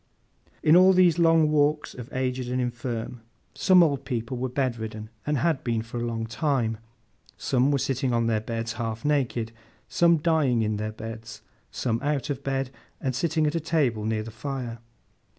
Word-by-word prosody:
In 155 Hz, -, +6 dB
all 185 Hz, +1 st, +7 dB
of 190 Hz, -, +5 dB
these 175 Hz, -2 st, +5 dB
Long 165 Hz, -2 st, +4 dB
Walks 150 Hz, 0 st, +1 dB
of 125 Hz, -1 st, -9 dB
aged 130 Hz, -1 st, -2 dB
and 125 Hz, +1 st, -1 dB
infirm, 120 Hz, -1 st, -4 dB, 0.3 s
some 185 Hz, -2 st, +5 dB
old 140 Hz, -4 st, 0 dB
people 125 Hz, -2 st, -3 dB
were 125 Hz, +1 st, -2 dB
bedridden, 110 Hz, -4 st, -3 dB, 0.2 s
and 150 Hz, -1 st, +1 dB
had 155 Hz, 0 st, +1 dB
been 115 Hz, -2 st, -1 dB
for 115 Hz, +1 st, -7 dB
a -, -, -2 dB
long 115 Hz, -1 st, -3 dB
time; 115 Hz, -2 st, -1 dB, 0.6 s
some 130 Hz, +1 st, +1 dB
were 145 Hz, -, +2 dB
sitting 130 Hz, -1 st, -1 dB
on 115 Hz, -1 st, +1 dB
their 110 Hz, -2 st, +1 dB
beds 115 Hz, +1 st, -3 dB
half 115 Hz, 0 st, -4 dB
naked; 125 Hz, -6 st, 0 dB, 0.4 s
some 170 Hz, -1 st, +4 dB
dying 150 Hz, -7 st, +2 dB
in 105 Hz, -1 st, -1 dB
their 110 Hz, +1 st, -3 dB
beds; 115 Hz, +1 st, -8 dB, 0.3 s
some 115 Hz, -2 st, -1 dB
out 145 Hz, -1 st, -1 dB
of 140 Hz, 0 st, -5 dB
bed, 135 Hz, -1 st, -2 dB, 0.3 s
and 130 Hz, -, -2 dB
sitting 160 Hz, +2 st, +1 dB
at 150 Hz, -, +1 dB
a 165 Hz, -, 0 dB
table 145 Hz, -9 st, 0 dB
near 110 Hz, 0 st, -1 dB
the 115 Hz, -, -8 dB
fire. 120 Hz, 0 st, -5 dB
125 Hz, 185 wpm, -26 LUFS, 115-150 Hz, 0.6 s, all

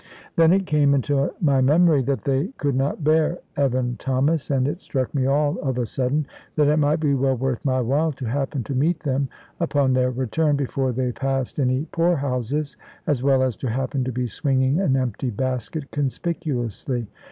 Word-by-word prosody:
Then 165 Hz, 0 st, +5 dB
it 195 Hz, +1 st, +3 dB
came 145 Hz, -4 st, +3 dB
into 140 Hz, +1 st, +1 dB
my 140 Hz, -5 st, +3 dB
memory 155 Hz, +2 st, +4 dB
that 135 Hz, +1 st, -1 dB
they 140 Hz, +4 st, +1 dB
could 145 Hz, -1 st, 0 dB
not 135 Hz, +4 st, -1 dB
bear 155 Hz, +3 st, +3 dB, 0.2 s
Evan 130 Hz, -3 st, 0 dB
Thomas, 135 Hz, +4 st, 0 dB
and 135 Hz, -2 st, +2 dB
it 170 Hz, +6 st, -3 dB
struck 130 Hz, -3 st, -2 dB
me 135 Hz, -3 st, +1 dB
all 145 Hz, +1 st, +1 dB
of 130 Hz, -3 st, -2 dB
a 125 Hz, -, 0 dB
sudden 135 Hz, +6 st, -1 dB, 0.3 s
that 150 Hz, -2 st, +3 dB
it 150 Hz, +1 st, +3 dB
might 150 Hz, +2 st, +2 dB
be 150 Hz, -3 st, +1 dB
well 135 Hz, -1 st, +1 dB
worth 130 Hz, -1 st, -2 dB
my 130 Hz, -2 st, +1 dB
while 145 Hz, +7 st, +1 dB
to 130 Hz, -1 st, -7 dB
happen 135 Hz, +2 st, -2 dB
to 135 Hz, -, -5 dB
meet 155 Hz, +6 st, +1 dB
them 135 Hz, -2 st, -1 dB, 0.3 s
upon 145 Hz, -5 st, +2 dB
their 130 Hz, 0 st, +2 dB
return, 130 Hz, +5 st, 0 dB
before 135 Hz, -1 st, -1 dB
they 125 Hz, +1 st, -1 dB
passed 135 Hz, +1 st, -2 dB
any 130 Hz, +2 st, +1 dB
poor 170 Hz, +1 st, +2 dB
houses, 140 Hz, +1 st, -2 dB, 0.3 s
as 140 Hz, -5 st, 0 dB
well 135 Hz, -1 st, +3 dB
as 130 Hz, -4 st, 0 dB
to 130 Hz, -, -3 dB
happen 130 Hz, +3 st, -1 dB
to 130 Hz, -, -2 dB
be 125 Hz, +1 st, -2 dB
swinging 135 Hz, -, +1 dB
an 145 Hz, -9 st, +2 dB
empty 130 Hz, -1 st, -1 dB
basket 130 Hz, +5 st, -3 dB
conspicuously. 135 Hz, -, -2 dB
135 Hz, 190 wpm, -23 LUFS, 130-150 Hz, 0.3 s, Then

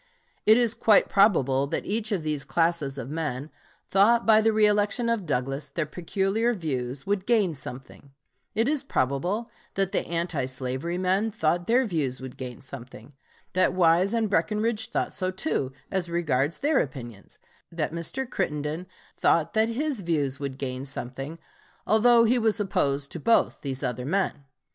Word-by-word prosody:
It 220 Hz, +1 st, +8 dB
is 235 Hz, -2 st, +2 dB
quite 215 Hz, -3 st, +4 dB
probable 140 Hz, -, +3 dB
that -, -, -3 dB
each 215 Hz, +1 st, -1 dB
of 190 Hz, -6 st, -1 dB
these 150 Hz, -2 st, -1 dB
classes 165 Hz, -5 st, 0 dB
of 135 Hz, +1 st, -6 dB
men 150 Hz, -2 st, -3 dB, 0.4 s
thought, 225 Hz, +5 st, +4 dB
by 220 Hz, -1 st, +6 dB
the 225 Hz, -, +3 dB
reëlection 210 Hz, +2 st, +2 dB
of 205 Hz, -7 st, -4 dB
Douglas, 135 Hz, +1 st, -2 dB
their 155 Hz, +3 st, -2 dB
peculiar 195 Hz, +8 st, 0 dB
views 135 Hz, -6 st, -3 dB
would 200 Hz, -1 st, -1 dB
gain 215 Hz, -8 st, +3 dB
something; 135 Hz, 0 st, -9 dB, 0.5 s
it 225 Hz, +2 st, +2 dB
is 290 Hz, -1 st, 0 dB
probable 175 Hz, -, -1 dB, 0.3 s
that 195 Hz, -1 st, 0 dB
the -, -, +1 dB
anti 170 Hz, -5 st, -1 dB
slavery 130 Hz, +6 st, -3 dB
men 190 Hz, +4 st, +1 dB
thought 175 Hz, -4 st, 0 dB
their 250 Hz, +3 st, +4 dB
views 150 Hz, -, -1 dB
would 130 Hz, -1 st, -8 dB
gain 125 Hz, -2 st, -7 dB
something; 130 Hz, +1 st, -11 dB, 0.4 s
that 185 Hz, -, +3 dB
Wise 180 Hz, +4 st, +3 dB
and 225 Hz, -1 st, +1 dB
Breckinridge 210 Hz, +4 st, 0 dB
thought -, -, -1 dB
so 185 Hz, -1 st, -1 dB
too, 185 Hz, -, -2 dB, 0.2 s
as 185 Hz, -3 st, -1 dB
regards 150 Hz, -3 st, 0 dB
their 290 Hz, -1 st, +2 dB
opinions; 120 Hz, -6 st, -6 dB, 0.3 s
that 165 Hz, -2 st, -2 dB
Mr. 170 Hz, +11 st, -3 dB
Crittenden 155 Hz, -, -3 dB, 0.3 s
thought 165 Hz, -2 st, +2 dB
that 220 Hz, 0 st, +2 dB
his 270 Hz, 0 st, -2 dB
views 145 Hz, -6 st, -1 dB
would 140 Hz, -2 st, -4 dB
gain 130 Hz, -1 st, -4 dB
something 135 Hz, +3 st, -6 dB, 0.5 s
although 230 Hz, +2 st, +5 dB
he 240 Hz, +2 st, +3 dB
was 220 Hz, -1 st, +1 dB
opposed 140 Hz, -8 st, 0 dB
to 170 Hz, -, -5 dB
both 230 Hz, +8 st, +2 dB
these 135 Hz, -1 st, -4 dB
other 125 Hz, 0 st, -2 dB
men. 175 Hz, -5 st, -1 dB
170 Hz, 160 wpm, -26 LUFS, 140-215 Hz, 0.5 s, It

